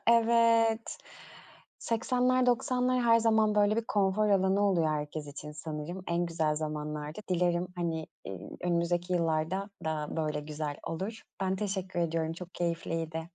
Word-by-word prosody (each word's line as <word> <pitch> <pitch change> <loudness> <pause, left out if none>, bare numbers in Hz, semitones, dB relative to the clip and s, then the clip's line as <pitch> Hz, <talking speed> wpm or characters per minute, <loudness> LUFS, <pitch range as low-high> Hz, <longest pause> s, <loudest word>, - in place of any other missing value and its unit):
Evet, 230 -1 +4 0.8
80'ler 250 +2 +1
90'lar 250 +1 +2
her 230 -1 +6
zaman, 220 -2 +3
böyle 210 0 +4
bir 230 - 0
konfor 205 +1 +2
alanı 195 0 +3
oluyor 185 -6 +3
herkes 150 0 -3
için 150 +1 -8
sanırım, 155 +3 -6
en 170 +1 +1
güzel 160 -2 0
zamanlardı. 150 +1 -4
Dilerim, 175 0 +1
hani, 165 -2 -2 0.2
iii, 95 -2 -7
önümüzdeki 175 +1 0
yıllarda 170 +4 0
da, 155 -1 -1
böyle 155 -2 -1
güzel 150 -1 -4
olur. 195 +7 -4 0.2
Ben 190 0 0
teşekkür 190 -3 -2
ediyorum 165 -1 0
çok 175 +2 -9
keyifliydi. 165 -1 -2
175 Hz, 135 wpm, -30 LUFS, 160-210 Hz, 0.8 s, her